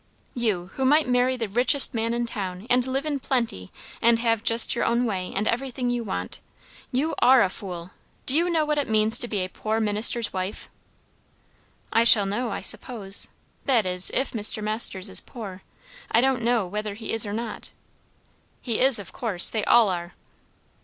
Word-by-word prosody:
"You, 200 -7 -3
who 265 - -4
might 295 +2 +3
marry 250 +1 +1
the 230 -2 -3
richest 245 +6 +3
man 230 0 -2
in 240 0 -2
town! 190 -4 -6
And 250 +1 +2
live 270 +3 -3
in 290 -2 -3
plenty, 230 - -3 0.3
and 230 0 +3
have 230 -2 -1
just 230 0 +5
your - - -2
own 235 +1 0
way, 185 -5 -4
and 210 +3 -2
everything 250 0 -2
you 240 -1 -3
want! 200 - -6 0.5
You 280 +6 -1
are 255 -1 +5
a 190 - -1
fool 180 -3 -8
I - - -35 0.3
Do 260 - +2
you 340 +3 +1
know 320 -3 0
what 300 0 -1
it 285 - -3
means 215 0 +2
to 240 - -1
be 205 -4 -3
a 185 - -3
poor 220 +4 -4
minister's 215 +1 +1
wife?" 185 +2 -6 1.2
"I 230 - +3
shall 220 -3 +7
know, 230 +5 -3
I - - -5
suppose. 205 -6 +4 0.4
That 245 -7 +1
is, 180 0 +1
if 265 - -1
Mr. 215 -1 -1
Masters 210 -3 +2
is - - +1
poor. 195 -6 -10 0.5
I 230 - +3
don't 260 0 +1
know 235 -3 0
whether 210 +2 -5
he 220 +1 -6
is 225 - +2
or 205 - -5
not." 230 +2 -6 0.9
"He 235 -4 -3
is 265 -1 +5
of 200 -4 -8
course! 205 -7 +1
They 220 -2 -2
all 235 -2 +4
are." 175 -1 -5
230 Hz, 195 wpm, -23 LUFS, 205-250 Hz, 1.2 s, shall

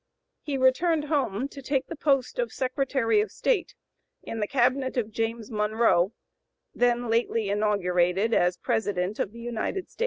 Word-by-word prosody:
He 285 -2 -3
returned 295 +5 +2
home 275 -6 0
to 280 - -10
take 270 0 -1
the 330 - -7
post 275 - 0
of - - 0
Secretary 255 -4 +1
of 210 - -3
State 405 - -1 0.5
in 225 - -5
the 210 - 0
cabinet 260 +1 +1
of 225 -3 -1
James 225 +1 -3
Monroe, 210 -3 +2 0.6
then 245 0 +1
lately 230 -2 0
inaugurated 200 0 +1
as 180 -2 +2
President 205 -4 -1
of 195 - -1
the 235 +1 -11
United 240 - -3
States. - - -24
235 Hz, 155 wpm, -26 LUFS, 210-270 Hz, 0.6 s, returned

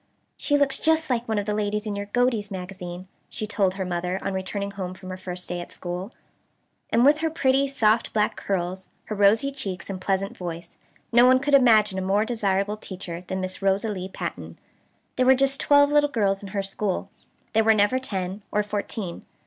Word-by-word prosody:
"She 290 - +1
looks 280 -1 +1
just 320 -2 +2
like 240 -1 0
one 220 -1 0
of 205 - -1
the 210 - -1
ladies 210 +1 -1
in 210 -1 -3
your 200 0 -4
'Godey's 230 -2 +1
Magazine,'" 185 -1 -7 0.2
she 215 - -4
had 210 - -9
told 190 -3 +1
her 190 -1 -3
mother, 180 +1 -2
on 195 - -2
returning 200 +1 -3
home 185 -2 -5
from 185 -1 -9
her - - -4
first 180 -1 -7
day 175 0 -3
at - - -10
school. 180 +4 -5 0.8
And 235 +2 +4
with 295 +2 +5
her 320 0 0
pretty 275 -3 +2
soft 230 -4 +2
black 210 -1 +1
curls, 185 -1 -3 0.2
her 215 - -4
rosy 210 +7 +4
cheeks 195 -9 -5
and 185 -1 -6
pleasant 195 +1 -1
voice, 170 -1 -7 0.4
no 240 +1 +7
one 255 0 +6
could 275 +2 -1
imagine 215 -7 +5
a - - -2
more 195 +3 +2
desirable 205 -3 0
teacher 180 -4 -7
than 190 +1 -4
Miss 185 +1 -4
Rosalie 195 -1 0
Pattten. - - -6 0.6
There 255 - +3
were 265 - +8
just 275 +1 +1
twelve 285 0 +5
little 295 0 +4
girls 200 -6 +1
in 200 - -8
her 200 0 -2
school. 195 0 -3 0.4
There 225 0 +4
were 220 0 +5
never 210 +5 +3
ten, 195 -5 -4
or 210 - +1
fourteen. 205 -3 -4
205 Hz, 205 wpm, -25 LUFS, 190-240 Hz, 0.8 s, were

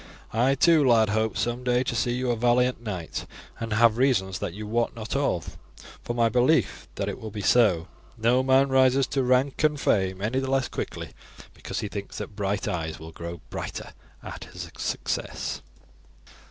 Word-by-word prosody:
I 125 +5 +3
too, 160 +2 +5
lad, 115 -4 +4
hope 110 -1 0
some 120 +1 -1
day 125 0 +2
to 125 - -2
see 120 +2 +1
you 125 0 0
a - - +1
valiant 125 +1 +2
knight, 95 -8 -5 0.3
and 115 -1 -3
have 115 +1 +4
reasons 95 -8 +2
that 85 - -4
you 105 +1 -6
wot 115 +3 0
not 115 +2 -5
of, 135 -11 -1 0.4
for 120 - -3
my 115 -1 +3
belief 125 +7 +2
that - - -2
it - - -4
will 110 - -5
be 105 -1 -6
so. 95 -7 +4 0.3
No 120 +3 +3
man 135 +1 +4
rises 130 0 +4
to 135 - -1
rank 130 +3 +2
and 150 -1 +3
fame 95 -7 +1
any 115 +6 0
the 135 0 -3
less 135 -1 +1
quickly - - -5 0.4
because - - -5
he 105 - -3
thinks 100 0 -6
that - - -6
bright 100 0 -1
eyes 80 -3 -3
will 80 +1 -9
grow 85 0 -7
brighter - - -6 0.3
at - - -8
his - - -9
success." - - -3
120 Hz, 185 wpm, -26 LUFS, 105-130 Hz, 0.4 s, too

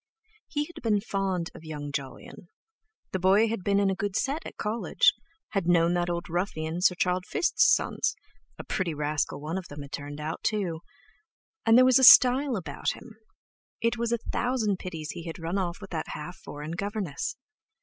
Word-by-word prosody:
He 295 -1 -2
had 345 - -12
been 215 -3 +2
fond 195 -4 -2
of - - -12
young 150 -2 -6
Jolyon: 140 +5 -7 0.6
the 190 - -1
boy 195 +5 +4
had 220 -4 -3
been 200 +1 +2
in 200 -1 +2
a - - -1
good 200 0 -3
set 290 +4 -1
at - - -11
College, 220 +3 +2 0.4
had 195 -5 -1
known 170 -1 +4
that 175 0 0
old 170 0 -3
ruffian 170 -1 -2
Sir 180 0 +4
Charles 180 +1 0
Fiste's - - +3
sons—a 425 - -2
pretty 175 -5 -2
rascal 150 -1 -1
one 160 +5 -3
of 185 - -10
them 145 0 -8
had 140 - -12
turned 145 +1 -6
out, 155 +2 -4
too; 190 -7 -1 0.9
and 225 +1 +7
there 255 - +7
was 255 -1 +6
style 255 +1 +6
about 165 -8 -3
him—it 230 +1 -7
was 235 0 -1
a 235 - +2
thousand 225 -6 0
pities 160 -4 -6
he 170 - -8
had 165 - -6
run 170 +3 -2
off 175 -2 -2
with 195 -2 -11
that 160 -3 -3
half 150 +4 -7
foreign 150 -2 -8
governess! 195 -4 -3
185 Hz, 180 wpm, -27 LUFS, 165-215 Hz, 0.9 s, and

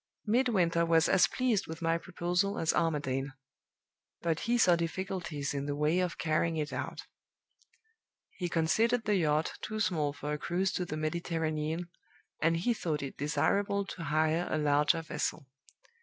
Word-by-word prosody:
"Midwinter 210 -8 +2
was 165 -1 +4
as 190 -2 +5
pleased 250 -6 0
with 160 0 -6
my 165 0 +2
proposal 180 +3 -1
as 165 - +1
Armadale; 145 -5 0 1.0
but 165 -2 0
he 240 - +4
saw 180 -7 +5
difficulties 170 -4 -3
in 140 0 -3
the 145 - -1
way 150 +4 +2
of 180 -1 -1
carrying 160 +1 0
it 150 -1 -2
out. - - -4 1.3
He 175 -2 -4
considered 220 +9 +2
the 210 -2 +2
yacht 155 -2 +1
too 215 0 -4
small 155 -8 +1
for 145 +1 -4
a 150 - -3
cruise 185 +4 0
to 180 - -2
the 155 -2 -4
Mediterranean, 160 0 -2 0.5
and 165 +1 +3
he 215 +8 +1
thought 155 -9 -2
it 140 - -6
desirable 200 +8 +1
to 180 -3 -7
hire 155 +3 +1
a - - 0
larger 150 +2 +2
vessel. 150 -1 -3
165 Hz, 155 wpm, -31 LUFS, 155-185 Hz, 1.3 s, as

